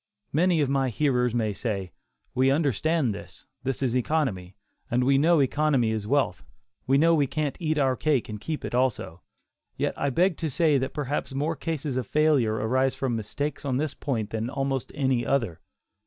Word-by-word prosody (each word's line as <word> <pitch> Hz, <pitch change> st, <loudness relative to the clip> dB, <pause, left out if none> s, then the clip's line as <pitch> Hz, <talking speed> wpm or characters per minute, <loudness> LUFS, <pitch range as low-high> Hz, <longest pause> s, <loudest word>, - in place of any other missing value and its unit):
Many 170 Hz, +1 st, +3 dB
of 145 Hz, -, +2 dB
my 135 Hz, -1 st, +1 dB
hearers 125 Hz, -2 st, +1 dB
may 110 Hz, -3 st, 0 dB
say, 100 Hz, -5 st, -3 dB, 0.4 s
"we 130 Hz, +1 st, +3 dB
understand 145 Hz, -1 st, +1 dB
this; 100 Hz, -, -11 dB, 0.2 s
this 135 Hz, +2 st, -2 dB
is 125 Hz, -2 st, 0 dB
economy, 120 Hz, -, -1 dB, 0.3 s
and 125 Hz, 0 st, +1 dB
we 135 Hz, +1 st, +4 dB
know 165 Hz, +2 st, +4 dB
economy 135 Hz, -4 st, +2 dB
is 110 Hz, -2 st, -3 dB
wealth; 130 Hz, -9 st, +1 dB, 0.4 s
we 135 Hz, +1 st, +4 dB
know 165 Hz, +3 st, +5 dB
we 145 Hz, -4 st, +3 dB
can't 150 Hz, 0 st, -2 dB
eat 155 Hz, -2 st, 0 dB
our 135 Hz, -3 st, +2 dB
cake 145 Hz, -2 st, +1 dB
and 105 Hz, -2 st, -7 dB
keep 155 Hz, +6 st, -4 dB
it -, -, -5 dB
also." 120 Hz, -9 st, -1 dB, 0.6 s
Yet -, -, 0 dB
I 140 Hz, -, 0 dB
beg 175 Hz, +5 st, +2 dB
to 160 Hz, -, -2 dB
say 150 Hz, -1 st, +3 dB
that 130 Hz, +1 st, -3 dB
perhaps 145 Hz, -1 st, -3 dB
more 150 Hz, +4 st, 0 dB
cases 150 Hz, -5 st, -3 dB
of 125 Hz, -5 st, -2 dB
failure 150 Hz, -8 st, +3 dB
arise 130 Hz, +5 st, +1 dB
from 130 Hz, -3 st, -1 dB
mistakes 140 Hz, +7 st, -4 dB
on 130 Hz, -3 st, 0 dB
this 150 Hz, 0 st, -1 dB
point 115 Hz, -6 st, -3 dB
than 115 Hz, +1 st, -2 dB
almost 135 Hz, -1 st, -2 dB
any 130 Hz, -4 st, +1 dB
other. 115 Hz, -12 st, 0 dB
135 Hz, 185 wpm, -26 LUFS, 120-150 Hz, 0.6 s, know